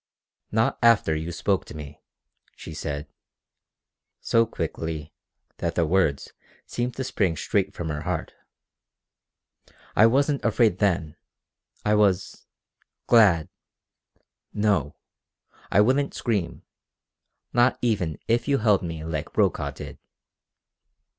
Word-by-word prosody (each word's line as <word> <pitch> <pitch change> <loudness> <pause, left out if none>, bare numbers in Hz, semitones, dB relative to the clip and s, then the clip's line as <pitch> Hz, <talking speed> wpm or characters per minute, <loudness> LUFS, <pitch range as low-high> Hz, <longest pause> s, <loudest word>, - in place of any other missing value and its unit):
"Not 110 +1 +1
after 115 -9 +4
you 80 +2 -4
spoke 95 +2 0
to - - -11
me," 75 0 -10 0.5
she 80 - -9
said, 75 -1 -4 1.1
so 115 0 +2
quickly 80 -8 -5 0.4
that 85 -1 -2
the 85 - +2
words 80 -4 +1 0.3
seemed 120 0 -3
to 130 - -3
spring 100 -10 0
straight 100 -1 -1
from 85 -2 -4
her 75 -1 -3
heart. - - -3 1.6
"I 110 - +7
wasn't 140 +4 +1
afraid 110 -4 +2
then. 85 -6 0 0.7
I 105 - +3
was 100 -3 +1 0.6
glad. 100 -10 +5 1.1
No, 100 -9 +1 0.8
I 100 - +5
wouldn't 135 +6 +2
scream 105 -8 -2 0.9
not 120 +1 +3
even 100 -10 0
if 120 +3 +1
you 140 -1 +3
held 105 -4 +3
me 80 -2 -5
like 80 -2 -4
Brokaw - - +1
did!" - - -9
100 Hz, 115 wpm, -25 LUFS, 80-115 Hz, 1.6 s, I